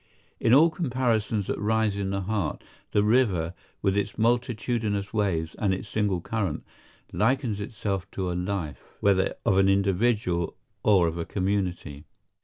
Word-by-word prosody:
In 115 - +2
all 155 +6 +7
comparisons 120 - 0
that - - -3
rise 110 -1 +1
in 100 -1 -2
the 100 0 -1
heart, 100 -3 -2 0.3
the 105 - +3
river, 105 -8 +2 0.3
with 95 -1 +2
its 100 0 -1
multitudinous 115 -3 0
waves 90 -7 0
and 100 -3 +2
its 100 - -7
single 100 -4 0
current, 100 -5 -2 0.5
likens 120 -2 +1
itself 100 -3 -3
to 95 -2 -2
a - - -2
life, 90 -4 -3 0.2
whether 95 -1 +2
of 95 - +4
an 95 0 +4
individual 100 -2 +1 0.2
or 95 -5 +4
of 85 +1 -3
a 85 - -2
community. 90 -7 -2
100 Hz, 150 wpm, -26 LUFS, 95-110 Hz, 0.5 s, all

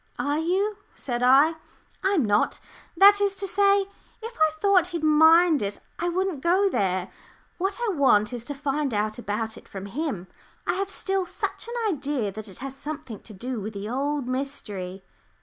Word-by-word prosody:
"Are 290 +1 0
you?" 390 +6 0 0.2
said 240 -3 -4
I. 270 +6 +6 0.5
"I'm 385 - +2
not. 205 0 +1 0.4
That 405 +2 +7
is 400 -1 +1
to 395 - -4
say, 400 +1 +4 0.4
if 455 +1 -8
I 315 0 +3
thought 385 -3 +4
he'd 340 -3 -5
mind 320 +1 +6
it, 200 0 -3 0.2
I 345 - 0
wouldn't 365 -4 -1
go 370 +5 +3
there. 185 - -1 0.5
What 390 +5 -1
I 410 - 0
want 250 - +3
is 240 -2 -5
to 285 - -5
find 275 -2 -1
out 215 +2 -1
about 220 0 -3
it - - -21
from 195 0 -7
him. 240 - -3 0.4
I - - +1
have 390 +2 -2
still 385 -2 -1
such - - -4
an 470 -4 -1
idea 275 -7 -2
that 215 +1 -7
it 190 - -10
has 270 -1 -6
something 275 -7 -7
to 215 - -12
do 240 +3 -4
with 215 +2 -5
the 200 +1 -5
old 280 +1 -1
mystery." 205 -9 -4
290 Hz, 185 wpm, -25 LUFS, 220-370 Hz, 0.5 s, That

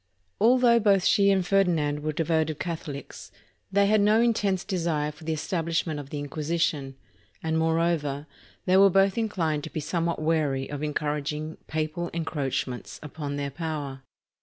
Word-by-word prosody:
Although 235 +1 +5
both 200 -4 +3
she 200 -1 +4
and 190 -2 +2
Ferdinand 170 -7 +2
were 155 +1 -1
devoted 160 -1 0
Catho 165 -3 -4
lics, 140 - -9 0.4
they 200 +1 +4
had 210 +1 +4
no 210 +2 +4
intense 210 -5 +1
desire 165 -6 -1
for 155 +1 -15
the 160 - -1
establishment 165 -1 -1
of 140 -1 -8
the 150 - -5
Inquisition, 145 -1 -2 0.5
and 160 0 0
moreover, 160 -3 0 0.4
they 185 0 +4
were 195 0 +7
both 195 +1 +3
inclined 170 -10 -1
to - - -6
be 160 - -4
somewhat 170 +2 -1
wary 155 -4 0
of 145 -1 -4
encouraging 150 +1 -2
papal 155 +2 -2
encroachments 135 -6 -3
upon 145 -1 -5
their 140 -1 -3
power. 145 -4 -4
160 Hz, 155 wpm, -26 LUFS, 150-185 Hz, 0.5 s, were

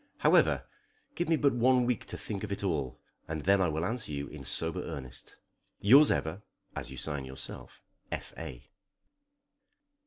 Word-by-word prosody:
However, - - +4 0.5
give 175 - -2
me 165 - +5
but 140 -3 +3
one 125 +1 +4
week 125 -2 -1
to - - -6
think 100 -2 -5
of 105 - -4
it 100 - -3
all, 75 -9 -1 0.3
and 80 -1 -3
then 100 +1 +4
I 90 - +4
will 80 +2 -1
answer 115 -5 -3
you 70 -1 -3
in - - -9
sober 80 -1 0
earnest. 65 -3 -7 0.4
Yours 135 +9 +8
ever 85 +6 0 0.3
(as - - -4
you 65 - -8
sign 70 +1 -3
yourself), 65 0 -7 0.3
F. - - -5
A. - - -8
90 Hz, 165 wpm, -31 LUFS, 70-120 Hz, 0.5 s, Yours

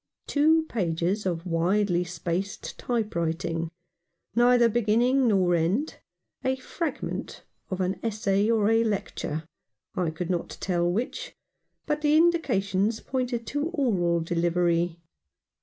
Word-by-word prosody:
Two 315 +2 +3
pages 190 - -1
of 170 -1 -2
widely 180 +2 +1
spaced 175 +2 -4
type 230 -3 -1
writing 165 0 -1 0.3
— 175 - -48
neither 240 0 +5
beginning 240 +4 +3
nor 190 -5 +3
end 180 - 0 0.2
— - - -48
a 260 0 +1
fragment 310 +5 -4 0.3
of 185 0 -2
an 185 0 -1
essay 210 -2 +1
or 220 -3 +3
a 225 +1 +4
lecture, 190 -7 -3 0.5
I 180 -3 0
could 170 +3 -3
not 175 -2 -3
tell 175 -2 +1
which 255 - -3 0.2
— - - -50
but 300 -1 -1
the 300 0 +4
indications 225 - +2
pointed 250 -3 -2
to 290 +5 -2
oral 195 - +1
delivery. 170 0 +1
200 Hz, 130 wpm, -27 LUFS, 175-245 Hz, 0.5 s, neither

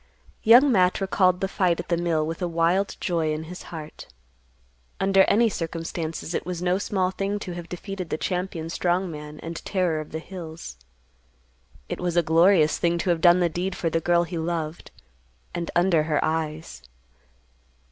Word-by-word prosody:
Young 250 +5 +7
Matt 185 -5 +3
recalled 185 -2 +2
the 195 - +1
fight 180 -3 +1
at - - -6
the 170 - +3
mill 165 -2 0
with 165 +3 -5
a 180 - 0
wild 170 +4 +1
joy 165 -3 0
in 155 +1 -3
his 180 +3 -9
heart. 155 -2 -9 0.9
Under 195 0 +4
any 230 +3 +4
circumstances 165 -3 -4
it - - -1
was 180 -1 -4
no 180 +1 +1
small 190 -2 0
thing 195 +2 -2
to 205 -3 -6
have 175 -1 -7
defeated 185 -1 -6
the - - -1
champion 180 -2 -3
strong 180 +1 0
man 150 0 -9
and 165 0 -6
terror 180 -5 0
of 155 - -11
the 160 - -3
hills. 165 - -8 1.1
It - - -5
was 175 -1 -1
a 175 - +5
glorious 165 0 +4
thing 170 0 +1
to 175 +1 0
have 165 -2 0
done 175 +1 +6
the 175 - +4
deed 180 +3 -3
for 165 - -2
the 165 - 0
girl 175 +1 +3
he 170 0 -5
loved, 160 -1 -3 0.6
and 170 -1 -3
under 175 -2 +4
her 150 -1 0
eyes. 160 0 -3
175 Hz, 180 wpm, -25 LUFS, 165-185 Hz, 1.1 s, Young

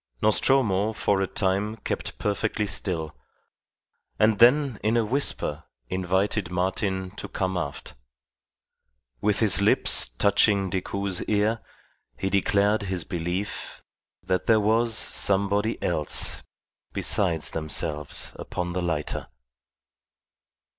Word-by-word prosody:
Nostromo 110 - +2
for 100 -2 0
a 95 - 0
time 100 +3 -1
kept 110 - -5
perfectly 105 +1 -1
still, 85 - -2 1.0
and 110 0 +3
then 125 0 +5
in 110 +2 +2
a 115 - +2
whisper 105 - 0 0.3
invited 95 +1 0
Martin 95 +1 -2
to 100 - -8
come 95 -1 -2
aft. 75 -5 -5 1.3
With 105 0 +1
his 105 -3 +5
lips 100 - +4
touching 100 - +2
Decoud's 95 0 -1
ear 110 +2 +1 0.6
he 95 - -2
declared 100 +2 +2
his 95 -4 -3
belief 90 +5 -4 0.4
that 90 -1 -1
there 110 -1 +5
was 110 +2 +2
somebody 100 +3 0
else 75 -4 +1 0.5
besides 85 -7 +1
themselves 75 -1 -3
upon 90 0 -4
the 90 - -2
lighter. 80 -4 -3
100 Hz, 105 wpm, -25 LUFS, 90-105 Hz, 1.3 s, then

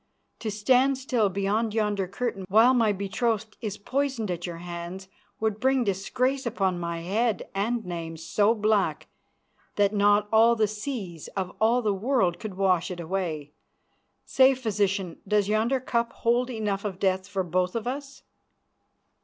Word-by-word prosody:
To 225 - -3
stand 255 +6 +3
still 250 -5 +1
behind 205 +3 -1
yonder 205 -3 0
curtain 200 -1 -3
while 225 +6 +6
my 230 -4 +3
betrothed 215 +2 -2
is 210 -2 -4
poisoned 260 -2 -1
at 175 0 -4
your 170 -1 -6
hands 175 +2 -7 0.3
would 220 -1 -1
bring 265 0 +2
disgrace 255 +7 -1
upon 190 -6 0
my 170 -1 -3
head 210 +4 0
and 220 +4 -1
name 165 -2 -5
so 205 +7 +2
black 210 -2 +1 0.7
that 205 0 +2
not 205 0 +3
all 230 +2 +6
the 220 -2 +2
seas 210 - -5
of 185 -2 -3
all 235 +3 +3
the 210 -2 +2
world 195 -4 +1
could 215 -4 -6
wash 185 -3 +2
it 180 -2 -6
away. 165 -4 -3 0.7
Say, 265 0 +5
Physician, 200 -7 -1
does 205 -1 +2
yonder 220 +5 +1
cup 235 -2 -1
hold 240 +2 +1
enough 210 -4 -2
of 200 -3 -4
death 190 0 0
for 195 -2 -2
both 180 +2 -1
of 230 -1 -2
us?" 275 +2 -5
210 Hz, 155 wpm, -26 LUFS, 190-235 Hz, 0.7 s, while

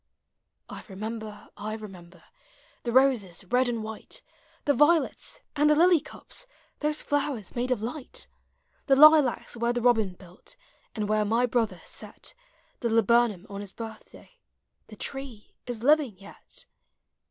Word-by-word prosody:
1 - - -8
remember, 215 +2 -7
I 215 +1 -5
remember 185 -5 -11 0.6
The 235 - -3
roses, 235 -9 +2
red 250 +5 +2
and 230 -2 -2
white, 220 - -7 0.4
The 285 - +4
violets, 300 +3 +2
and 295 0 +4
the 300 - +5
lily 345 +1 +6
cups. - - -8 0.2
— - - -38
Those 300 0 -1
llowers 285 -8 -2
made 245 +1 -1
of 240 -4 0
light! 295 - -6 0.6
The 270 - +5
lilacs 300 -4 +6
where 235 +1 0
the 245 - -1
robin 225 -6 +3
built, 180 - -15 0.4
And 210 -2 -2
where 215 0 +2
my 230 +4 +2
brother 235 -2 -1
set - - -7 0.5
The 235 - -1
laburnum 230 -3 +3
on 200 0 -7
his 200 -2 -9
birthday, 230 - -11 0.2
— - - -50
The - - -11
tree 270 -6 -7
is 235 -2 -4
living 285 -7 +3
yet 200 +1 -12
235 Hz, 150 wpm, -27 LUFS, 215-275 Hz, 0.6 s, lily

